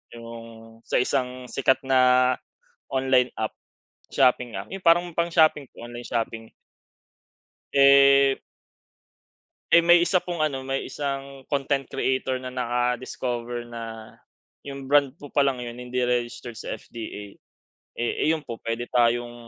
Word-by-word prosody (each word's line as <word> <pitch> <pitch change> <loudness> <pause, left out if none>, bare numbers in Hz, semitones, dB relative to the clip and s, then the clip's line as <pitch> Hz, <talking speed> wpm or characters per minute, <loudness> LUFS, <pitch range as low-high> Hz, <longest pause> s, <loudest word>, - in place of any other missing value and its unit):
yung 115 0 -9 0.4
sa - - -2
isang 125 0 -1
sikat 130 +1 +1
na 130 -1 +4 0.6
online 130 -1 +3
app, 110 - -1 0.6
shopping 125 -2 +2
app, 100 - -8
yung 195 -1 -7
parang 175 +1 +4
pang 170 0 +1
shopping, 155 -3 +4 0.2
online 120 +1 -8
shopping. 115 -1 -3 1.2
Eh. 140 0 +6 1.3
Eh, 170 0 +6
may 175 0 +7
isa 180 +1 +3
pong 175 -2 -4
ano, 135 -4 -2
may 135 0 -3
isang 140 -1 -5
content 140 -1 -1
creator 130 0 -1
na 130 - -5
naka-discover 120 -1 -3
na 115 -1 -8 0.6
yung 140 -1 -8
brand 140 -2 +4
po 145 -3 -12
palang 135 -3 +1
yun, 120 0 -7
hindi 125 0 -3
registered 120 -1 -2
sa - - -5
FDA. 105 -3 -9 0.6
Eh, 120 +5 0
ayun 155 -2 0
po 115 - -7
puwede 115 +1 -3
tayong 120 0 +1
130 Hz, 130 wpm, -25 LUFS, 120-140 Hz, 1.3 s, may